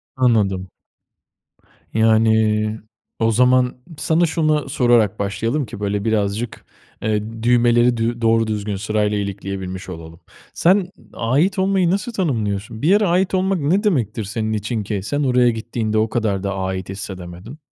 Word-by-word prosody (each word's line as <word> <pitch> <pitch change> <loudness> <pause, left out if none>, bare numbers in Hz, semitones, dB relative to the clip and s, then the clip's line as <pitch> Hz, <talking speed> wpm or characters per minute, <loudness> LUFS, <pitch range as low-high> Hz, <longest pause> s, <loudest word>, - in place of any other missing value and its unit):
Anladım. 105 -7 +1 1.3
Yani. 110 -1 +2 0.4
O 115 0 +3
zaman 125 +2 +3 0.2
sana 165 +2 +2
şuna 155 -3 0
sorarak 120 -6 +2
başlayalım 115 +8 -1
ki 105 - -9
böyle 100 +1 -2
birazcık, 110 +1 -1 0.4
eee, 110 +1 -2
düğmeleri 120 0 +4
dü 115 +1 -1
doğru 115 0 +3
düzgün 105 -1 -2
sırayla 105 +1 0
ilikleyebilmiş 95 -2 -5
olalım. 80 -1 -9 0.3
Sen 185 +1 +2 0.2
ait 150 - +1
olmayı 190 -2 +2
nasıl 225 +5 -2
tanımlıyorsun? 110 - -2
Bir 155 - +1
yere 205 +2 +4
ait 185 +2 +1
olmak 190 -1 +1
ne 175 +9 +1
demektir 120 - 0
senin 110 +2 -3
için 110 +1 -2
ki 100 -2 -3
sen 145 +8 -1
oraya 125 -2 +3
gittiğinde 110 -1 -2
o 110 0 +2
kadar 100 -4 -1
da 100 0 -2
ait 95 -1 -3
hissedemedin? 95 - -8
110 Hz, 140 wpm, -20 LUFS, 105-130 Hz, 1.3 s, düğmeleri